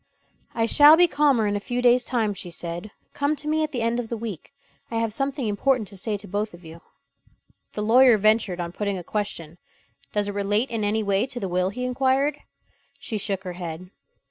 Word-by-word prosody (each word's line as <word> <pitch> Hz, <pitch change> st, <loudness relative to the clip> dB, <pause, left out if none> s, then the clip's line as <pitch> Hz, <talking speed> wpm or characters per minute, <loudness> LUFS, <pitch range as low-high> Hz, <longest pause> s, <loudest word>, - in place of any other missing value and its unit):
"I 225 Hz, -, +2 dB
shall 295 Hz, +6 st, +7 dB
be 355 Hz, +1 st, +6 dB
calmer 285 Hz, -8 st, +2 dB
in 205 Hz, 0 st, 0 dB
a -, -, 0 dB
few 245 Hz, +4 st, -3 dB
days' 245 Hz, 0 st, +4 dB
time," 225 Hz, -5 st, 0 dB
she 190 Hz, -2 st, -8 dB
said. 170 Hz, +4 st, -6 dB, 0.2 s
"Come 285 Hz, +2 st, 0 dB
to 300 Hz, -, -6 dB
me 310 Hz, +1 st, +1 dB
at 310 Hz, -, -3 dB
the 245 Hz, -4 st, -2 dB
end 230 Hz, +1 st, 0 dB
of 230 Hz, -2 st, -5 dB
the 235 Hz, -, -3 dB
week. 215 Hz, -8 st, -7 dB, 0.4 s
I 230 Hz, -, -5 dB
have 225 Hz, -1 st, 0 dB
something 275 Hz, -1 st, -1 dB
important 220 Hz, +2 st, +1 dB
to 200 Hz, -, -13 dB
say 205 Hz, +2 st, -2 dB
to 200 Hz, +1 st, -12 dB
both 205 Hz, 0 st, -3 dB
of 175 Hz, 0 st, -17 dB
you." 165 Hz, +1 st, -11 dB, 0.9 s
The 210 Hz, -, -3 dB
lawyer 240 Hz, +1 st, +6 dB
ventured 215 Hz, -3 st, +2 dB
on 170 Hz, -1 st, -3 dB
putting 200 Hz, +1 st, -2 dB
a 180 Hz, -, -7 dB
question. 175 Hz, -4 st, -4 dB, 0.5 s
"Does 205 Hz, -1 st, 0 dB
it 205 Hz, -, -3 dB
relate 205 Hz, +5 st, 0 dB
in 225 Hz, -2 st, -2 dB
any 215 Hz, +2 st, 0 dB
way 200 Hz, +3 st, +1 dB
to 245 Hz, -, -7 dB
the 195 Hz, -, -3 dB
will?" 180 Hz, +1 st, 0 dB
he 250 Hz, +5 st, -4 dB
inquired. 270 Hz, +3 st, +1 dB, 0.6 s
She 215 Hz, -, -4 dB
shook 195 Hz, -1 st, -3 dB
her 180 Hz, -2 st, -5 dB
head. 175 Hz, +1 st, -7 dB
215 Hz, 220 wpm, -24 LUFS, 195-250 Hz, 0.9 s, shall